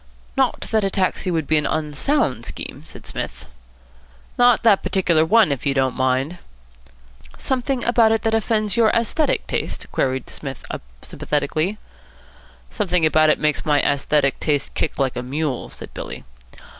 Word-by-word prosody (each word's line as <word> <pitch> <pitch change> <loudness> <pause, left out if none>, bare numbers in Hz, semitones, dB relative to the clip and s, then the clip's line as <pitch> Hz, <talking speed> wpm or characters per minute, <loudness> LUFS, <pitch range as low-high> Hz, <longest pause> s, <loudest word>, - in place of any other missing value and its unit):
"Not 265 -2 +1
that 220 -2 +2
a 195 - +1
taxi 190 0 0
would 165 -3 0
be 155 +2 +2
an 150 -1 +1
unsound 150 - 0
scheme," - - -6
said - - -12
Psmith. - - -6 0.9
"Not 245 -1 +4
that 215 -4 +5
particular 185 -4 +2
one, 215 0 +4
if 140 - -2
you 140 -1 0
don't 130 -1 +2
mind." 130 +6 0 1.0
"Something 260 -1 -1
about 230 -2 +4
it 225 - +1
that 225 - +1
offends 215 -2 +1
your 230 -2 +4
aesthetic 235 +7 +1
taste?" - - -3
queried 130 -1 -1
Psmith 135 -3 -8 0.4
sympathetically. 155 +7 -2 0.9
"Something 180 -6 +1
about 155 0 +4
it 155 - +4
makes 150 -1 0
my 150 -3 +3
aesthetic 140 0 +1
taste 145 -3 -1
kick - - -2
like 135 -2 0
a - - -2
mule," 135 +1 -3
said - - -10
Billy. - - -7
160 Hz, 155 wpm, -21 LUFS, 140-220 Hz, 1.0 s, that